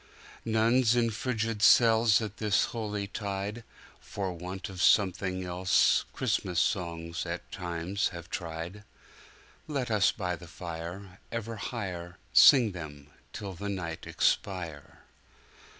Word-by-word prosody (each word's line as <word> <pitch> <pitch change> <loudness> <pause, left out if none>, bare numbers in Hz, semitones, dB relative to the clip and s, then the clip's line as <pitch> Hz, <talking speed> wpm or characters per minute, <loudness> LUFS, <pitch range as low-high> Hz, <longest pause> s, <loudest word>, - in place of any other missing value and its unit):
Nuns 115 +2 +3
in 115 -1 +2
frigid 110 -1 -2
cells 115 -1 +6
At 110 -1 -6
this 105 -2 +2
holy 105 -3 -3
tide, 100 +2 -4 0.4
For 95 -3 -4
want 90 +3 -6
of 95 -2 -6
something 95 -2 +3
else, 90 +1 +3
Christmas 90 -2 -1
songs 85 -2 -1
at - - -6
times 90 +2 -2
have 85 -1 -8
tried. 85 +4 -5 0.8
Let 135 -6 -2
us 100 -3 +4
by 90 -4 -3
the 85 - -12
fire 85 +3 -8
Ever 115 -1 -4
higherSing 100 - +3
them 75 -4 -9 0.2
till 100 +3 -6
the 100 +3 -5
night 85 -4 -5
expire! 85 -6 -1
95 Hz, 120 wpm, -29 LUFS, 85-110 Hz, 0.8 s, cells